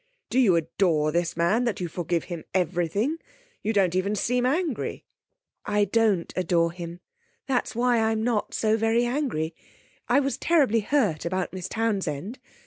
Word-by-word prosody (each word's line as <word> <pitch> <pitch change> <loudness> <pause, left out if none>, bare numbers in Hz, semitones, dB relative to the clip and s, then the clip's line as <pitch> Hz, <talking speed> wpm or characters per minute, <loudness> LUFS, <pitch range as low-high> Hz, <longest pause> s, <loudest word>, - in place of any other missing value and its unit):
Do 255 - +3
you 205 -9 +5
adore 165 -2 +1
this 170 0 -1
man, 185 +8 +2
that 230 -5 -1
you 180 - -2
forgive 170 0 -2
him 170 -3 -6
everything? 185 - 0 0.4
You 215 - 0
don't 195 -5 +2
even 190 +3 0
seem 245 +4 +1
angry.' 310 -1 -2 0.6
'I 205 0 +2
don't 215 -7 +2
adore 170 -2 +2
him, 175 0 -8 0.4
that 260 -2 0
is - - -8
why 240 0 +2
I'm 220 0 +1
not 230 -3 -1
so 220 0 +2
very 225 +2 +2
angry. 240 - -1 0.6
I - - +5
was 275 -1 -1
terribly 280 -10 +3
hurt 210 - +1
about 185 +2 -2
Miss 185 -1 -5
Townsend. 200 - -2
205 Hz, 160 wpm, -26 LUFS, 170-235 Hz, 0.6 s, you